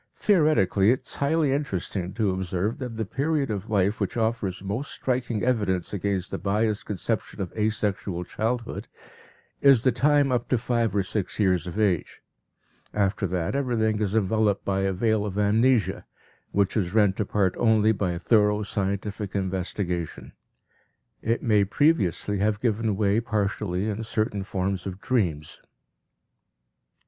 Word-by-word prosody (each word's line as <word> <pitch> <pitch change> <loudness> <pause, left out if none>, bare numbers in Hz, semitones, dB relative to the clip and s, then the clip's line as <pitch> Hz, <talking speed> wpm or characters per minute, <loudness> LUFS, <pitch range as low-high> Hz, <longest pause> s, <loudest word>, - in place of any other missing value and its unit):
Theoretically 150 - +3
it 125 +2 +2
is - - -2
highly 145 0 +2
interesting 95 - -2
to 105 -4 +1
observe 95 +3 -2
that 125 -4 -5
the 110 - -1
period 140 +3 -1
of 100 -3 -4
life 100 0 +1
which 100 - -2
offers 110 -5 -1
most 105 +9 -3
striking 120 -4 -2
evidence 105 -8 0
against 100 -2 -2
the - - -3
biased 105 +2 0
conception 100 -6 -3
of 95 -3 -4
asexual 105 -4 -1
childhood, 115 +6 -3 0.7
is 135 -5 +6
the 130 - +4
time 145 0 +3
up 120 -1 -1
to 125 - +3
five 115 -3 0
or 100 - +2
six 95 +1 -3
years 90 -4 +2
of 90 - -6
age; 95 -7 0 0.7
after 100 -1 +1
that 90 +4 -2
everything 110 -6 0
is 105 0 0
enveloped 110 -1 +1
by 95 -1 0
a 95 0 +1
veil 110 +2 +1
of 100 -1 -4
amnesia, 110 +3 +2 0.5
which 100 -1 +1
is 95 -2 -1
rent 105 -3 +3
apart 100 -2 +1
only 110 -1 +4
by 95 -4 -1
thorough 105 +3 +3
scientific 100 0 -3
investigation; 95 -3 -3 0.9
it 115 +1 -1
may 105 -4 +4
previously 105 - +1
have 105 +1 +1
given 110 -2 0
way 105 +1 +2
partially 105 -3 -1
in 110 0 -3
certain 110 -2 -2
forms 95 -1 -2
of 95 0 -6
dreams. 90 - -1
105 Hz, 145 wpm, -25 LUFS, 95-115 Hz, 0.9 s, is